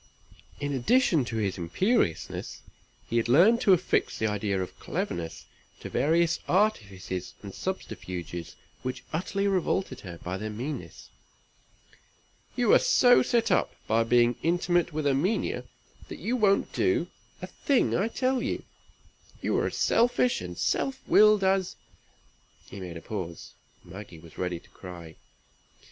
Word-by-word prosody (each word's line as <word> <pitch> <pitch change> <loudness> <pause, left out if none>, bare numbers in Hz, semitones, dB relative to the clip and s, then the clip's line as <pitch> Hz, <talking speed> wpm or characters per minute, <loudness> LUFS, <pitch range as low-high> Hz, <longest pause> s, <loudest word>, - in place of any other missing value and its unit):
In 145 0 -2
addition 160 - +3
to 115 - -5
his 100 -4 -1
imperiousness, 85 - -1 0.4
he 115 - -1
had 115 0 +1
learned 195 - +6
to 195 - +4
affix 180 0 +1
the 110 - -1
idea 105 -2 -1
of 95 - -6
cleverness 85 -1 -4 0.3
to - - -8
various 165 +3 +2
artifices 100 - -1
and 100 -1 -8
subterfuges 90 - -5 0.3
which 130 0 -5
utterly 195 +4 -1
revolted 185 -7 0
her 85 -3 -9
by 90 +2 -5
their 110 +2 -4
meanness. 125 +8 -6 1.5
"You - - +3
are - - +8
so 260 - +5
set 230 -3 +1
up, - - +1
by 115 +1 +2
being 120 0 +3
intimate 175 0 +1
with 155 -1 -3
Erminia, 145 +10 0 0.4
that - - -8
you 245 - -2
won't 200 -4 +2
do 370 -2 +1 0.3
a - - -5
thing 275 -3 +1
I 195 - +1
tell 255 +2 0
you; - - -3 0.8
you - - -1
are - - +1
as - - -5
selfish 245 +1 +2
and 90 -1 -7
self 270 0 -1
willed 210 -1 +6
as" 190 -1 +1 1.0
he 100 - -8
made 90 -3 -7
a - - -9
pause. 90 -6 -6 0.3
Maggie 95 0 -10
was 80 0 -14
ready 90 -2 -2
to - - -22
cry. 85 -4 -10
135 Hz, 145 wpm, -27 LUFS, -, 1.5 s, are